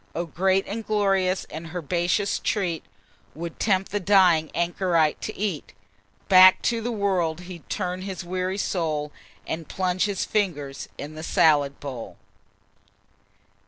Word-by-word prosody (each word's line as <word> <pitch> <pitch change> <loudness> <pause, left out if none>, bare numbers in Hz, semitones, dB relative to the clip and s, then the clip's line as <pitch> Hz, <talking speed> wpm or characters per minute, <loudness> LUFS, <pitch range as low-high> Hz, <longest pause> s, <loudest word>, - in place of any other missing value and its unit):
Oh! 170 - -1
great 190 +4 +1
and 225 +3 -5
glorious, 195 -3 +1
and 160 +2 -8
herbaceous 175 +4 0
treat, 180 -7 -1 0.5
'Twould 165 +1 -7
tempt 195 -3 +1
the 205 - 0
dying 180 -5 +4
anchorite 170 -2 +1
to 215 - -5
eat. 195 -7 -3 0.5
Back 185 -1 +8
to 230 -1 +1
the 240 +2 -2
world 185 -6 0
he'd 180 -3 -11
turn 180 0 -3
his 190 -2 -6
weary 185 +2 -2
soul, 155 -7 -1 0.3
And 160 -1 -5
plunge 185 0 0
his 205 -2 -2
fingers 150 -10 -2
in 150 +2 -7
the 155 - -8
salad 145 -3 +3
bowl." 130 -5 -7
180 Hz, 135 wpm, -25 LUFS, 160-195 Hz, 0.5 s, Back